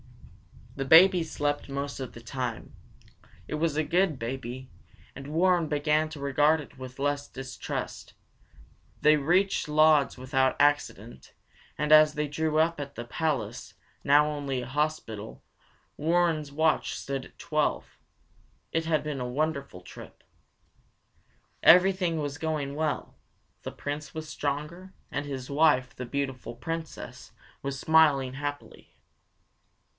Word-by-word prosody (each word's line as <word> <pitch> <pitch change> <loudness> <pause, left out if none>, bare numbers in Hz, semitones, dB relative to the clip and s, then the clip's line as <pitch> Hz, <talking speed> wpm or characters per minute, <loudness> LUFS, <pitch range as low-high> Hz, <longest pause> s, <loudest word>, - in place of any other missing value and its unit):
The 135 - -3
baby 175 +5 +7
slept 145 -3 -2
most 140 +1 -4
of 130 -2 -6
the 120 - -11
time. 120 -2 -5 0.7
It - - -3
was 155 -1 0
a 155 - +2
good 170 0 +1
baby, 130 +1 -6 0.4
and 135 +1 -9
Warren 170 +2 +2
began 150 +1 +1
to 155 -2 -9
regard 145 +3 +3
it 135 -2 -11
with 130 0 -9
less 145 +1 -1
distrust. 130 -1 -6 0.9
They 150 0 +6
reached 180 +4 +1
Lodz 155 -2 +4
without 130 +1 +1
accident 145 - 0 0.4
and 150 0 -1
as 155 0 +7
they 150 0 -2
drew 155 +1 -1
up 160 0 +2
at 140 -1 -6
the 120 - -5
palace, 120 - -3 0.3
now 145 +1 +5
only 140 -4 -3
a - - -6
hospital, 130 -6 -3 0.5
Warren's 160 -2 +1
watch 160 +2 +1
stood 135 -1 -4
at - - -18
twelve. - - -2 0.7
It 165 0 -1
had 155 -3 +1
been 150 -3 -4
a 125 - -3
wonderful 140 - -3
trip. 90 - -13 1.4
Everything 180 -1 +5
was 145 0 -4
going 155 -3 -2
well. 155 0 -2 0.5
The - - -6
Prince 145 0 -6
was 160 0 -5
stronger, 150 +6 -4 0.2
and 145 +1 -3
his 135 -2 -5
wife, 140 -3 +2
the 125 - -6
beautiful 135 -2 -4
Princess, 165 +6 -7 0.3
was 140 0 -4
smiling 145 -5 +4
happily. 145 +1 -7
145 Hz, 130 wpm, -28 LUFS, 135-155 Hz, 1.4 s, baby